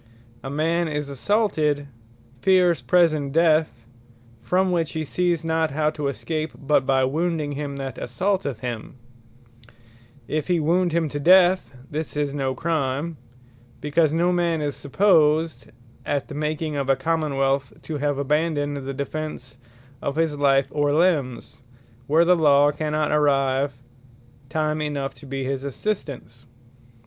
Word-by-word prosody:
A 135 - -5
man 165 +4 0
is 150 -2 -3
assaulted, 150 - 0 0.6
fears 180 -3 +3
present 155 -6 +2
death, 155 -7 +2 0.6
from 185 +5 +1
which 165 -3 -1
he 160 - -2
sees 175 +2 0
not 160 -1 +1
how 150 +2 0
to 150 -2 -3
escape, 155 +2 -3
but 140 -1 +1
by 135 -1 +3
wounding 155 +2 -1
him 145 0 -4
that 135 -2 -6
assaulteth 145 - -2
him; 120 0 -5 1.3
If 155 -1 -2
he 175 -2 +2
wound 175 +3 +2
him 165 0 +1
to 145 - -4
death, 180 -1 +4 0.2
this 155 0 -4
is 145 -1 -1
no 135 -2 -2
Crime; 160 -1 -2 0.6
because 150 +1 +2
no 170 +3 +2
man 170 -2 +1
is 145 -2 -2
supposed 155 - +2 0.4
at 140 -2 -2
the - - -7
making 150 +1 -2
of 140 -1 -2
a 135 - +5
Common 155 +1 -1
wealth, 135 0 +1
to 155 -2 -4
have 145 -1 0
abandoned 145 0 0
the 135 0 -5
defence 140 -4 -5 0.4
of 140 - -3
his 160 -2 0
life, 135 -1 +2
or 145 -1 +1
limbes, 150 -10 0 0.5
where 160 +4 +4
the 180 +1 +5
Law 145 -3 +4
cannot 150 0 -1
arrive 140 -2 +2 0.7
time 155 0 -1
enough 145 -2 -3
to 145 - -13
his 135 0 -3
assistance. 140 - -5
150 Hz, 140 wpm, -23 LUFS, 140-165 Hz, 1.3 s, a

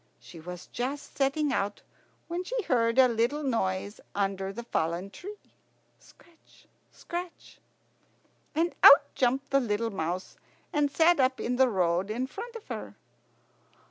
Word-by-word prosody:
She 120 +8 -13
was 180 +2 -8
just 270 +4 -5
setting 280 +1 +1
out 200 -2 -2 0.4
when 345 +2 -3
she - - -3
heard 230 -5 +1
a 260 -1 +8
little 240 +6 0
noise 200 -5 -1
under 195 -1 -1
the 235 +4 -7
fallen 175 -2 -2
tree. 410 - -9 0.6
"Scratch 335 -1 -23 0.3
scratch." 350 0 -8 1.0
And 335 +2 +1
out 280 - +8
jumped 265 +2 0
the 275 - +5
little 230 -2 -1
mouse, 180 0 -4 0.4
and 295 -1 +2
sat 325 +3 +4
up 260 0 +2
in 245 +1 -1
the 260 -1 +5
road 180 -1 +1
in 240 +4 -1
front 465 - -8
of 455 - -9
her. - - -6
245 Hz, 140 wpm, -28 LUFS, 195-295 Hz, 1.0 s, a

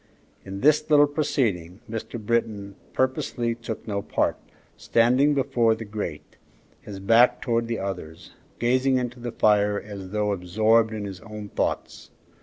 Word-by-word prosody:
In 95 0 -7
this 150 +2 +3
little 145 -1 +7
proceeding 115 - -1
Mr. 115 +1 -5
Britton 105 -2 -1 0.2
purposely 130 -2 -1
took 115 -1 -7
no 100 -1 -2
part, - - 0 0.4
standing 125 +6 +3
before 125 -5 +2
the 115 0 -8
grate, 100 -7 -6 0.4
his 100 -2 -8
back 120 +5 +4
towards 115 -2 0
the 115 -1 -2
others, 90 -5 -6 0.3
gazing 130 +2 +2
into 125 0 -3
the 120 0 -5
fire 105 -2 +3
as 100 -3 -9
though 105 +1 0
absorbed 110 +5 +2
in 105 -2 -4
his 95 -2 -7
own 105 0 -9
thoughts. - - -3
110 Hz, 145 wpm, -25 LUFS, 100-120 Hz, 0.4 s, little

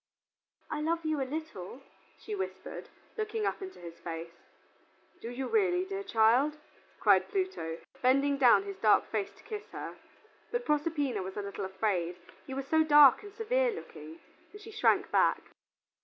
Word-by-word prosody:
"I 300 - -2
love 330 +1 -1
you 310 -2 0
a 260 - -3
little," 275 - -6 0.3
she 430 - -7
whispered, 385 -2 -6 0.3
looking 430 0 -2
up - - -2
into 380 -1 -8
his 170 -1 -10
face. 165 0 -6 0.9
"Do 230 - -5
you 255 +2 -4
really, 375 -4 +2
dear 395 +1 -4
child?" 250 - +3 0.4
cried - - +4
Pluto, 375 - -2 0.2
bending 275 +3 +3
down 255 +7 +6
his 400 -1 -7
dark 215 -2 +4
face 210 -3 -1
to - - -19
kiss 425 -2 -7
her. - - -6 0.5
But 485 0 -2
Proserpina 295 -7 0
was 190 +1 -7
a 205 - -2
little 200 0 -5
afraid, 190 -3 -1 0.3
he 265 - -6
was 270 0 -3
so 315 +1 +4
dark 295 -3 +7
and 410 -1 -10
severe 485 +4 +1
looking, 160 - -10 0.3
and 415 - -11
she 430 +1 -11
shrank 435 - +2
back. - - +3
295 Hz, 165 wpm, -31 LUFS, -, 0.9 s, dark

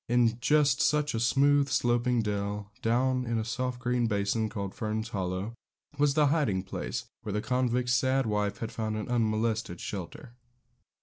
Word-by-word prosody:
In 120 -1 +3
just 140 0 +3
such 150 -1 +2
a 115 - -1
smooth, 140 +4 +3
sloping 120 -1 +2
dell, 100 0 -3
down 125 +2 +1
in 115 -1 -1
a 110 - -1
soft 125 +1 -2
green 120 -1 +1
basin, 105 +1 0
called 100 -3 -5
Fern's 110 +1 -3
Hollow, 95 +1 -3 0.5
was 145 -1 +3
the 150 -1 +5
hiding 105 - +1
place 95 - -4 0.2
where 105 - -5
the 105 - 0
convict's 125 +1 0
sad 130 +1 +2
wife 105 -1 -1
had 115 - -5
found 110 -1 -3
an 105 - -4
unmolested 110 -4 0
shelter. 105 - -7
115 Hz, 165 wpm, -29 LUFS, 105-125 Hz, 0.5 s, the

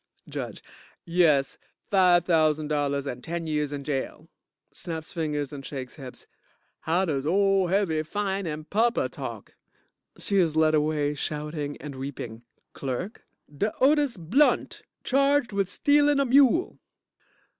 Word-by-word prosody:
JUDGE - - -6 0.4
Yes, 165 -6 +2 0.3
five 180 -3 +5
thousand 155 -3 +2
dollars 140 -2 0
and 125 -2 -5
ten 170 0 -4
years 150 -2 -1
in 145 -1 -5
jail. 140 -2 -4 0.5
(Snaps 160 -2 -6
fingers 150 -4 -2
and 140 -1 -7
shakes 130 -2 -6
hips) 130 -4 -10 0.5
How 175 +4 +1
does 140 -6 -1
ole 195 +3 +3
heavy 175 -4 +1
fining 190 -3 -3
papa 225 +8 +1
talk? - - -8 0.6
(She 200 - -1
is 165 -5 +2
led 160 0 +4
away, 150 -1 +1
shouting 150 0 -4
and 150 -2 -8
weeping) 130 -4 -7 0.3
CLERK 140 - -5 0.3
De 210 +9 0
Otis 285 -3 +3
Blunt, 220 - +2 0.2
charged 275 -1 +2
wid 200 -2 0
stealin' 290 +5 +3
a 275 - +3
mule. 275 +6 +4
160 Hz, 130 wpm, -26 LUFS, 145-200 Hz, 0.6 s, five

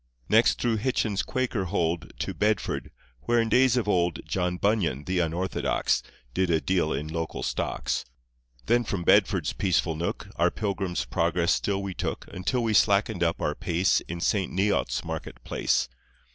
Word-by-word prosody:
Next 115 +2 +4
through 115 -2 +1
Hitchin's 110 -3 0
Quaker 125 -6 -1
hold 85 -3 -1
To - - -2
Bedford, 105 +1 0 0.4
where 120 0 +3
in 115 -1 +1
days 125 +2 +4
of 120 - 0
old 90 -4 +2
John 90 -1 -1
Bunyan, 90 - +1
the 90 +1 -1
unorthodox, 85 +3 0 0.3
Did 95 -1 +1
a 80 -2 +3
deal 90 -2 0
in 75 +3 -2
local 80 0 -4
stocks. - - -2 0.6
Then 120 +1 +3
from 100 -5 -3
Bedford's - - +3
peaceful 90 -4 +1
nook 85 +2 -3
Our - - +4
pilgrim's 95 -4 -2
progress 85 0 +1
still 100 -1 0
we 95 -1 -4
took - - -4
Until 120 +7 -1
we 110 -1 +1
slackened - - +3
up - - +1
our 75 - +1
pace 90 +4 +1
In 85 +1 -5
Saint 95 +1 +1
Neots' 100 +2 0
market 80 -1 -6
place. 65 - 0
95 Hz, 160 wpm, -27 LUFS, 85-105 Hz, 0.6 s, Next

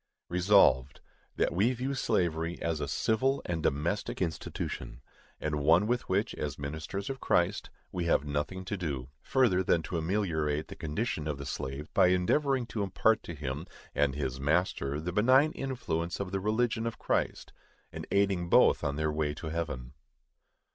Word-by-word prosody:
Resolved, 90 -8 +4 0.4
That - - +1
we 105 +9 +3
view 130 +3 -2
slavery 85 -8 0
as 80 -2 -2
a 70 - -2
civil 120 - +1
and 85 -2 -2
domestic 80 +8 -1
institution, 80 -7 -4 0.4
and 75 -1 -1
one 80 +7 +5
with 120 +2 -1
which, - - +1
as 75 -2 -4
ministers 80 +7 -5
of 135 -1 -4
Christ, 85 -6 +1 0.2
we 90 -2 -2
have 80 -4 +2
nothing 75 +6 -3
to 100 - -2
do, 70 -9 -4
further 125 -9 +3
than 85 -2 +2
to 85 +1 -2
ameliorate 80 -4 -1
the - - -8
condition 80 0 -2
of 75 -2 -2
the 70 - -7
slave 70 +4 -5
by 90 - +5
endeavoring 125 +9 +2
to 115 -2 -4
impart 105 +3 +2
to 85 - -7
him 70 +2 -4 0.3
and 70 -2 +1
his 65 -3 -3
master 75 -1 0
the 85 +3 -4
benign 130 - +5
influences 90 - -3
of 100 -2 -3
the 95 - -1
religion 110 +3 0
of 115 - -4
Christ, - - -1 0.4
and - - -6
aiding 95 -3 +1
both - - +5
on 70 0 -1
their 75 0 0
way 75 -1 -1
to 80 +1 -6
heaven. 75 -7 -4
85 Hz, 170 wpm, -30 LUFS, 75-105 Hz, 0.4 s, one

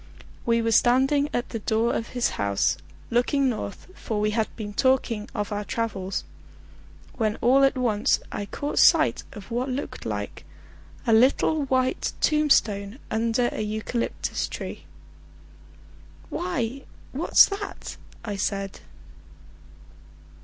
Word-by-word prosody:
We 230 0 +3
were 230 - +1
standing 265 +5 +4
at 245 - -2
the 225 - -4
door 220 +2 +1
of 230 - -2
his 245 - +2
house, 100 -1 +1 0.4
looking 260 +3 +2
north, 215 -4 -5
for 220 - -4
we 210 0 +1
had 220 0 +1
been 205 -2 -6
talking 235 -3 +1
of 210 -2 -2
our 205 0 -2
travels, 200 -4 -3 0.9
when 215 -3 +1
all 265 +3 +4
at 270 -1 +3
once 225 -5 +2
I 205 - -4
caught 290 +6 -2
sight - - +5
of 210 +2 -11
what 245 +3 -1
looked 260 +3 -4
like - - -4 0.6
a 230 - +3
little 275 +5 +4
white 260 -1 0
tombstone 230 -9 +2
under 230 +2 +1
a - - -4
eucalyptus 215 +3 -2
tree. - - -7 1.5
"Why, 275 -8 -2 0.3
what's 295 +6 +6
that?" 405 0 -6 0.3
I 205 -3 -3
said. 195 0 -2
230 Hz, 125 wpm, -25 LUFS, 210-260 Hz, 1.5 s, what's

